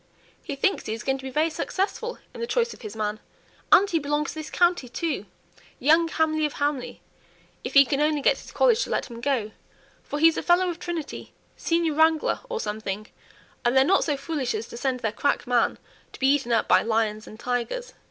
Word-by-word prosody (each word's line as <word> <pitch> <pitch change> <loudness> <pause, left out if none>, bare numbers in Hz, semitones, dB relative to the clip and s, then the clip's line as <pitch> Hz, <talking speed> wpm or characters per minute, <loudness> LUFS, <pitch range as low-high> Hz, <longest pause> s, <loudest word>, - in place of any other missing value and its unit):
He 285 - -5
thinks 385 +8 0
he 220 - -2
is 225 - -8
going 270 0 0
to - - -11
be 265 - -5
very 310 +5 +1
successful 400 +8 -2 0.2
in - - -8
the 470 - -2
choice 475 -1 0
of - - -16
his 215 -2 -8
man 215 0 -2 0.5
and 400 - +7
he 335 -4 +1
belongs 295 0 -1
to 315 - -6
this 310 - -6
county, 350 -8 +2
too, 270 - -3 0.5
young 320 +5 +4
Hamley 315 -1 0
of 295 - -10
Hamley, 285 -3 -2 0.6
if - - -5
he 275 0 +9
can 275 +2 0
only 300 -1 +1
get - - +3
his - - -12
college 485 -1 +3
to - - -7
let - - -2
him 235 0 -8
go, 245 -5 0 0.5
for 290 - -5
he 320 +2 +6
is 325 - -4
a - - 0
Fellow 355 +1 +3
of 340 - -9
Trinity, 335 -4 -6 0.2
senior 335 -2 0
wrangler 315 +1 +3
or 470 -2 -2
something; 210 - -4 0.5
and 245 +2 +2
they're 265 - +7
not 385 +5 +3
so 290 -3 -1
foolish 280 - -2
as 435 - -4
to - - -9
send 255 -1 -1
their 220 - 0
crack 285 +6 0
man 245 -1 +2 0.4
to - - -11
be 270 +1 +4
eaten 270 -4 -1
up 230 - +2
by - - +5
lions 220 -1 -1
and 215 - -11
tigers!" 250 - -3
290 Hz, 220 wpm, -25 LUFS, 245-330 Hz, 0.6 s, he